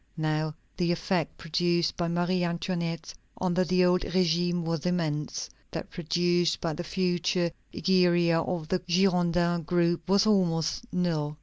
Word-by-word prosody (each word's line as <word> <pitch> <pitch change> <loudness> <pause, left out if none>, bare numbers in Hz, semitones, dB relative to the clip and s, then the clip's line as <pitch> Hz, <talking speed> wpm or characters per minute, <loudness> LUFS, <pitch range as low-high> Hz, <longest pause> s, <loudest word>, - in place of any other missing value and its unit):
Now 155 0 -1 0.2
the 175 -1 +1
effect 175 -1 -1
produced 170 0 0
by 175 - -1
Marie 175 +1 0
Antoinette 170 -1 -3 0.3
under 185 0 +1
the 185 0 +3
old 180 0 +3
régime 175 -1 +1
was 165 0 -2
immense; 155 -5 -2 0.2
that - - -6
produced 175 0 +1
by 165 -2 -2
the 175 - -5
future 175 -1 0 0.2
Egeria 175 -3 +3
of 165 -2 -3
the 185 - +1
Girondin 175 -2 +2
group 170 0 0
was 200 +2 +4
almost 185 +1 +1
null. 155 -5 -1
175 Hz, 135 wpm, -28 LUFS, 165-180 Hz, 0.3 s, was